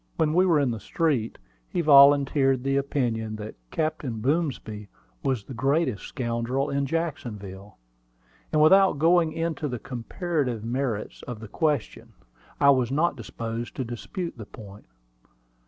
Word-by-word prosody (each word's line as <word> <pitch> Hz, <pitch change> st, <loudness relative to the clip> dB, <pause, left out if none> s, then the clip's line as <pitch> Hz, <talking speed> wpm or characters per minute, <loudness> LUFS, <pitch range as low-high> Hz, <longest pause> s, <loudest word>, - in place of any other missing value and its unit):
When 155 Hz, -2 st, +2 dB
we 185 Hz, +2 st, +4 dB
were 165 Hz, -4 st, +4 dB
in 135 Hz, -4 st, +1 dB
the 115 Hz, -, -4 dB
street, 130 Hz, -, -1 dB, 0.3 s
he 175 Hz, -, -1 dB
volunteered 140 Hz, -3 st, +5 dB
the 135 Hz, 0 st, 0 dB
opinion 120 Hz, -6 st, -1 dB
that 110 Hz, 0 st, -7 dB, 0.2 s
Captain 155 Hz, -7 st, -2 dB
Boomsby 125 Hz, -6 st, -2 dB, 0.3 s
was 130 Hz, -6 st, -1 dB
the 130 Hz, -, -9 dB
greatest 135 Hz, -, 0 dB
scoundrel 125 Hz, +2 st, -2 dB
in 140 Hz, 0 st, 0 dB
Jacksonville; 105 Hz, -, -5 dB, 0.7 s
and 155 Hz, 0 st, +4 dB
without 190 Hz, 0 st, +6 dB
going 165 Hz, +1 st, +4 dB
into 165 Hz, -1 st, -2 dB
the 125 Hz, -3 st, -3 dB
comparative 125 Hz, -, -3 dB
merits 120 Hz, -3 st, -3 dB
of 120 Hz, -3 st, -6 dB
the 110 Hz, -, -9 dB
question, 150 Hz, 0 st, -2 dB, 0.5 s
I 140 Hz, -, +6 dB
was 130 Hz, -3 st, +2 dB
not 160 Hz, +3 st, +1 dB
disposed 115 Hz, 0 st, -6 dB
to 130 Hz, -, -2 dB
dispute 125 Hz, -, -6 dB
the 110 Hz, -, -8 dB
point. 105 Hz, -2 st, -12 dB
135 Hz, 140 wpm, -26 LUFS, 115-155 Hz, 0.7 s, without